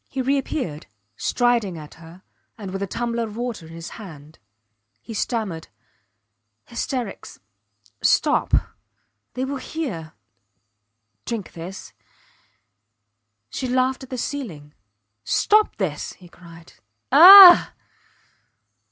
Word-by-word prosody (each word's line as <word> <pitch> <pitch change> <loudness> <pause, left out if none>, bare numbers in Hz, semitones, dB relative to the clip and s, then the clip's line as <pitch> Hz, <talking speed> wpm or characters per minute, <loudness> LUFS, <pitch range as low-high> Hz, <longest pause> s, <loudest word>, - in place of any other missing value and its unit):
He 270 - -6
reappeared, 260 - -3 0.3
striding 235 - 0
at 150 -1 -11
her, 165 +3 -16 0.3
and 200 -4 -8
with 195 +1 -5
a 200 - -3
tumbler 235 +3 -3
of 215 0 -10
water 235 -9 -5
in 165 - -13
his 165 0 -9
hand. 155 -5 -13 0.6
He 230 - -10
stammered: 210 -7 -4 1.0
Hysterics 245 -7 -6 0.6
Stop - - +1 0.8
They 255 +1 -2
will 275 +1 -4
hear 220 - -6 1.1
Drink 225 -5 -5
this. 175 +3 -10 1.6
She 260 - -4
laughed 255 +1 0
at 265 - -11
the 255 - -5
ceiling. 185 - -6 0.5
Stop 425 - +2
this! 165 -8 -4
he 180 - -17
cried. 170 -1 -16 0.4
Ah! 360 +5 +10
215 Hz, 105 wpm, -22 LUFS, 165-260 Hz, 1.6 s, Ah